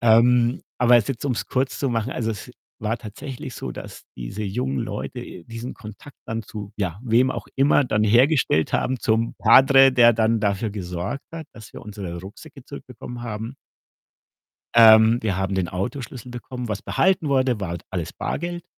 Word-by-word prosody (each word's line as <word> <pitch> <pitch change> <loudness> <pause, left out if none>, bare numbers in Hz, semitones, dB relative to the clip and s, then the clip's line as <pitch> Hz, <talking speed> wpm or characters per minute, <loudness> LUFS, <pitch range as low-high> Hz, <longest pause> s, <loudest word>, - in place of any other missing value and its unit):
Ähm, 120 +1 +4 0.2
aber 125 0 +6
es 115 -4 +2
jetzt, 135 -1 -4
um's 125 -4 -2
kurz 130 +1 -1
zu 140 - 0
machen, 115 +2 -1
also, 115 -2 -2
es 105 -4 -7 0.3
war 110 +2 -2
tatsächlich 120 +4 -8
so, 65 - -6
dass - - -9
diese 65 - -6
jungen 70 -9 -2
Leute, - - -5
äh, 85 - -10
diesen 115 +4 -7
Kontakt 110 +6 -12
dann 115 0 -3
zu 100 0 -8
ja, 95 -3 -3
wem 125 +2 +3
auch - - -5
immer 140 +1 +3
dann 105 -3 0
hergestellt 120 - +3
haben 130 0 0
zum 115 0 0
Padre, 135 +3 +6
der 120 -2 +6
dann 110 0 +1
dafür 100 +1 0
gesorgt 90 +5 -5
hat, 165 -2 -7
dass 110 -2 -13
wir - - -9
unsere 100 -5 -7
Rucksäcke 135 - -12
zurückbekommen 125 -3 -9
haben. 115 +1 -5 1.2
Ähm, 110 0 +7
wir 100 -4 -1
haben 95 0 -1
den 95 -2 -1
Autoschlüssel 125 +5 -5
bekommen. 125 0 -7
Was 105 -2 -4
behalten 185 -5 +1
wurde, 130 -5 +1
war 85 -3 -3
alles 90 -4 -4
Bargeld 175 0 -4
115 Hz, 175 wpm, -23 LUFS, 105-125 Hz, 1.2 s, Ähm